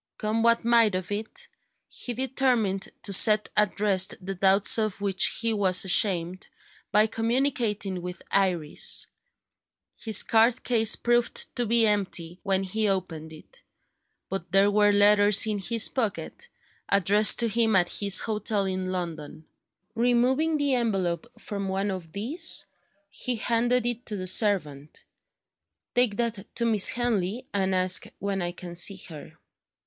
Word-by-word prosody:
Come 215 +1 -2
what 230 0 +2
might 230 -4 +3
of 185 +1 -5
it, 215 +2 -4 0.4
he 245 - -6
determined 245 -6 -1
to 200 - 0
set 215 +2 +4
at 210 -2 +1
rest 195 -3 +1
the 195 +1 -6
doubts 195 +4 +2
of 215 -3 -2
which 195 -2 +1
he 230 -1 0
was 190 -3 +1
ashamed, 185 -2 -1 0.4
by 210 +1 +4
communicating 225 -5 -2
with 180 +1 -8
Iris. 180 -6 -1 0.9
His 220 -3 +3
card 230 +2 +2
case 225 -3 +2
proved 240 0 -1
to 245 -2 -2
be 230 +1 +3
empty 185 -4 -2
when 195 -1 -1
he 210 +3 -1
opened 165 -5 -4
it; 480 - -15 0.7
but 185 -3 -6
there 195 +2 +3
were 205 0 +3
letters 205 0 +4
in 210 -2 -2
his 225 +3 +1
pocket, 260 - -4 0.4
addressed 200 +2 +3
to 235 - +1
him 225 -1 +1
at 175 -1 +2
his 200 -2 +3
hotel 210 -2 -2
in 185 -1 -3
London. 160 -4 -6 0.5
Removing 250 +7 +1
the 285 -2 0
envelope 200 -5 -1
from 200 -2 -5
one 195 +1 -2
of 175 -4 -7
these, 245 - +2 0.5
he 250 +4 -2
handed 235 +2 0
it 240 +1 -2
to 215 - -3
the 185 -2 -5
servant: 175 -8 +1 0.9
"Take 245 -4 +2
that 230 -4 -4
to 235 - -1
Miss 215 -4 +5
Henley, 235 -1 -2
and 190 -1 0
ask 185 0 +3
when 200 -1 -3
I 175 0 -3
can 175 -1 -10
see 195 +3 +1
her." 155 -3 -11
205 Hz, 145 wpm, -26 LUFS, 185-230 Hz, 0.9 s, Miss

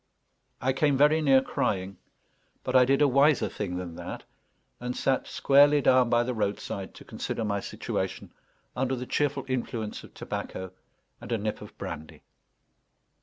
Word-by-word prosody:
I 130 +1 +1
came 140 0 +2
very 150 +3 +5
near 135 -3 +5
crying, 95 -6 -2 0.7
but 130 - -2
I 125 -1 +7
did 135 +3 +3
a - - +6
wiser 140 +2 +4
thing 90 -4 -4
than 90 -2 -5
that, - - -7 0.6
and 125 0 -4
sat 135 -1 +1
squarely 145 +1 +5
down 130 -3 +4
by 120 0 +3
the 125 +1 -2
roadside 100 -2 -3
to - - -13
consider 115 - -4
my 100 -1 0
situation - - -4 0.4
under 130 +1 0
the 125 0 -5
cheerful 140 0 0
influence 120 -4 -3
of - - -15
tobacco 95 -1 -5 0.5
and - - -9
a 115 - +2
nip 105 0 -3
of - - -12
brandy. 75 +1 -7
125 Hz, 160 wpm, -28 LUFS, 105-135 Hz, 0.7 s, I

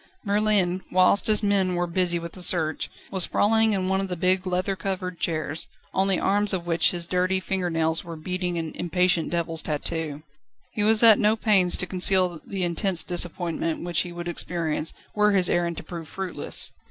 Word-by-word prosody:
Merlin, 200 -3 +1
whilst 185 +2 +3
his 215 0 +3
men 195 -3 +1
were 175 0 0
busy 175 0 0
with 170 0 -7
the 185 - -8
search, 160 -3 +1 0.2
was 190 - -1
sprawling 220 +4 +3
in 190 -2 -1
one 190 +1 +1
of 195 - -3
the 180 - -4
big 185 +2 +1
leather 185 +2 -1
covered 185 -1 -4
chairs, 155 -1 -2 0.3
on 190 +1 +2
the 190 -2 +1
arms 205 +1 +2
of 175 -2 -2
which 165 -1 +3
his 175 -1 -4
dirty 185 +2 0
finger 185 -1 -2
nails 160 -1 0
were 170 -2 -8
beating 180 +2 -3
an 160 -1 -4
impatient 180 -1 0
devil's 165 -1 -2
tattoo. 150 0 -3 0.5
He 210 - -2
was 220 +1 +4
at 220 -3 +8
no 210 +1 +3
pains 200 -5 +3
to 180 - 0
conceal 180 -2 +2
the 195 -2 -4
intense 175 0 0
disappointment 170 -2 -3
which 175 -2 -1
he 175 - -6
would 175 0 -7
experience, 165 -2 -2 0.2
were 210 0 +2
his 185 -2 +3
errand 170 -1 0
to - - -6
prove 170 -3 -8
fruitless. 190 +1 -1
180 Hz, 190 wpm, -24 LUFS, 170-190 Hz, 0.5 s, at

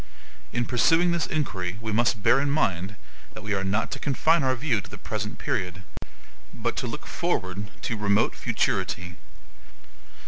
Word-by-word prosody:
In 120 0 0
pursuing 165 +9 +4
this 170 -2 +1
inquiry, 95 - -2
we 110 -1 -3
must 115 -1 +2
bear 120 +4 +6
in 140 +1 +1
mind 95 - +1 0.4
that 110 - -8
we 110 -1 -1
are 95 -1 0
not 100 +3 0
to 135 - -3
confine 155 +4 +3
our 130 -1 +2
view 125 -5 +1
to - - -13
the - - -8
present - - -4
period, 90 +1 -2 0.7
but - - -2
to - - -1
look - - -6
forward 95 +3 -2
to 115 - -1
remote 100 -1 +2
futurity. 90 -1 -1
110 Hz, 165 wpm, -26 LUFS, 95-135 Hz, 0.7 s, bear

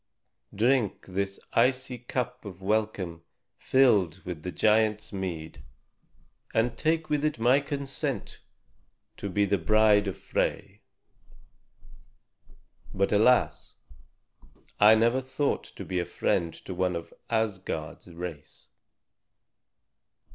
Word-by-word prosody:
Drink 120 0 +1
this 100 +1 -3
icy 125 +1 +2
cup 125 +1 -4
of 95 -4 -9
welcome 100 -5 -1 0.4
filled 100 -10 +3
with 90 -4 -5
the 90 - -5
giant's 105 +1 +2
mead, 80 -6 -5 0.9
and 115 +1 +2
take 160 +3 0
with 150 -1 0
it 155 -3 0
my 125 +4 +4
consent 140 -1 -4 0.8
to 100 - -4
be 100 +2 +2
the 100 0 +1
bride 105 +3 +4
of 95 - -3
Frey. - - -2 2.1
But 100 +1 0
alas! 110 +5 +2 1.0
I 105 +1 +8
never 115 +4 +2
thought 135 +2 -1
to - - -10
be 90 -1 -2
a 85 - -1
friend 85 -1 0
to 95 - -5
one 90 0 0
of 85 0 -7 0.2
Asgard's 95 -9 -2
race." 85 -3 -8
105 Hz, 110 wpm, -28 LUFS, 90-125 Hz, 2.1 s, I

